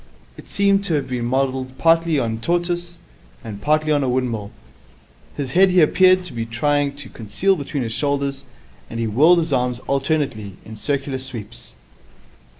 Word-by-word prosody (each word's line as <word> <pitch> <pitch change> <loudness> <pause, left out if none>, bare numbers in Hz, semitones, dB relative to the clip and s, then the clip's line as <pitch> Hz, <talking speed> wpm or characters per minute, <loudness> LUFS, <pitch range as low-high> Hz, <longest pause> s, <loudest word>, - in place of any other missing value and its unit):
It - - -14
seemed 200 0 +2
to 170 - 0
have 140 -3 -1
been 125 -2 -2
modelled 130 0 -1
partly 165 +2 +3
on 115 -4 0
a - - -4
tortoise 175 +5 -2 0.5
and 105 -3 -8
partly 155 +2 +1
on 145 -2 +2
a 130 - 0
windmill. 120 -5 -1 0.9
His 135 -3 -3
head 190 +5 +5
he 180 0 +3
appeared 185 +3 +5
to 180 - -7
be 115 -1 -3
trying 140 +5 0
to 140 -3 -9
conceal 180 - 0
between 145 -4 -3
his 115 -1 -4
shoulders, 140 +2 -1 0.5
and 115 - -5
he 115 - 0
whirled 150 +11 +5
his 165 -3 0
arms 125 -1 0
alternately 135 -7 -1
in 110 - -9
circular 135 +3 -2
sweeps. 115 - -8
135 Hz, 170 wpm, -21 LUFS, 120-160 Hz, 0.9 s, head